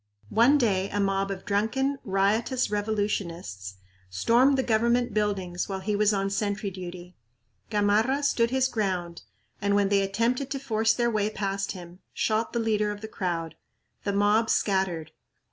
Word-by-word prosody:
One 245 - +5
day 200 -7 +1
a 205 - -2
mob 195 0 +1
of 195 -1 -5
drunken, 260 +7 0
riotous 210 +6 +1
revolutionists 190 - -3 0.3
stormed 240 - +3
the 265 - +1
government 235 +1 +1
buildings 195 -4 -1
while 190 -1 -3
he 205 +2 -1
was 210 0 +3
on 195 -1 -1
sentry 205 0 -2
duty. 180 -1 -9 0.5
Gamarra 215 +7 +2
stood 235 -5 +2
his 260 +1 +2
ground 185 -7 -2 0.4
and, 200 0 +2
when 200 -1 +3
they 200 -1 +3
attempted 230 +7 0
to 275 - -3
force 225 -4 +1
their 235 -1 +1
way 210 -1 +1
past 195 -1 -2
him, 175 -1 -11 0.2
shot 220 +1 0
the - - -2
leader 215 -2 +1
of 205 0 -5
the 220 - -6
crowd. 170 -6 -3 0.5
The 200 - 0
mob 205 +3 +2
scattered. 190 -6 0
205 Hz, 160 wpm, -27 LUFS, 195-225 Hz, 0.5 s, One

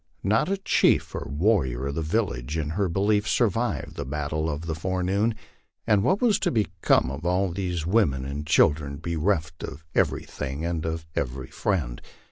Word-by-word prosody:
Not 110 - +2
a 195 - +1
chief 195 - +2
or 70 - -4
warrior 70 - +1
of 70 - -2
the 80 - -2
village 80 - -1
in 75 -1 -2
her 95 +2 0
belief 105 +4 +1
survived 120 +1 0
the - - -2
battle 75 +3 -2
of 75 -1 -3
the 80 - -2
forenoon. 95 +6 0 0.5
And 105 -2 +4
what 185 - +2
was 220 -5 +4
to - - +1
become 105 - +2
of 70 +3 -6
all 90 +2 +1
these 90 -3 -2
women 80 -10 +2
and 70 +2 -5
children, 75 -1 +3
be 85 +3 -3
reft 80 -1 0
of 80 +1 -7
everything 70 +5 -1
and 85 -2 -2
of 80 -1 -3
every 65 -1 -3
friend? 75 -13 -1
80 Hz, 175 wpm, -26 LUFS, 75-100 Hz, 0.5 s, And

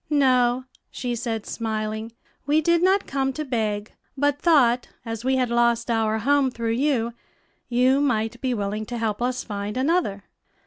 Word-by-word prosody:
"No," 255 -3 +3 0.2
she 245 -1 -4
said, 225 -2 -3
smiling; 220 0 -3 0.4
"we 300 +2 +4
did 340 +2 +2
not 380 +2 +3
come 270 -1 -1
to 305 +4 -4
beg, 215 -5 -2 0.2
but 290 +1 +1
thought, 250 -8 +4 0.2
as 225 0 -5
we 265 +1 +2
had 250 -2 0
lost 235 0 +2
our 220 -1 +1
home 275 +4 +2
through 230 -2 -3
you, 235 -2 +1 0.6
you 255 +3 +3
might 235 -3 0
be 255 -2 0
willing 210 +1 -3
to 240 - -4
help 220 -1 -2
us 250 +1 -1
find 205 +1 -4
another." 260 - 0
240 Hz, 165 wpm, -24 LUFS, 225-270 Hz, 0.6 s, we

